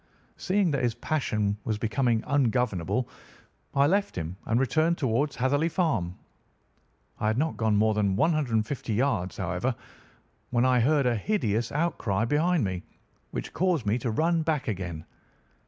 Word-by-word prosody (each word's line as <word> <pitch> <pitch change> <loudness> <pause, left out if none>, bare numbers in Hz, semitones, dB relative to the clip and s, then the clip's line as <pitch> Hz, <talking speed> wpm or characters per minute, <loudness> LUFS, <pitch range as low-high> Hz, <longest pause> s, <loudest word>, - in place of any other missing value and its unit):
Seeing 190 -2 +1
that 140 -1 0
his 120 -2 0
passion 110 -7 -1
was 110 -2 -1
becoming 115 +1 +1
ungovernable, 125 - +1 0.7
I 140 0 +5
left 200 +6 +1
him 80 0 -4
and 115 +2 +2
returned 155 +6 +2
towards 135 +2 0
Hatherley 145 +6 +1
Farm. 145 - 0 1.0
I 110 - 0
had 110 +1 +1
not 155 +3 0
gone 110 -2 +1
more 110 +1 +3
than 100 -2 +1
150 120 - 0
yards, 110 -7 0
however, 95 +8 -1 0.7
when 120 0 +2
I 130 -1 +4
heard 140 +3 +3
a 120 -1 +2
hideous 115 - 0
outcry 115 - 0
behind 155 +4 +2
me, 95 -3 -2 0.5
which - - -5
caused 175 -9 +1
me 105 +4 +1
to 120 - -2
run 165 +8 +1
back 155 -3 -1
again. 90 -6 -4
125 Hz, 150 wpm, -27 LUFS, 110-150 Hz, 1.0 s, I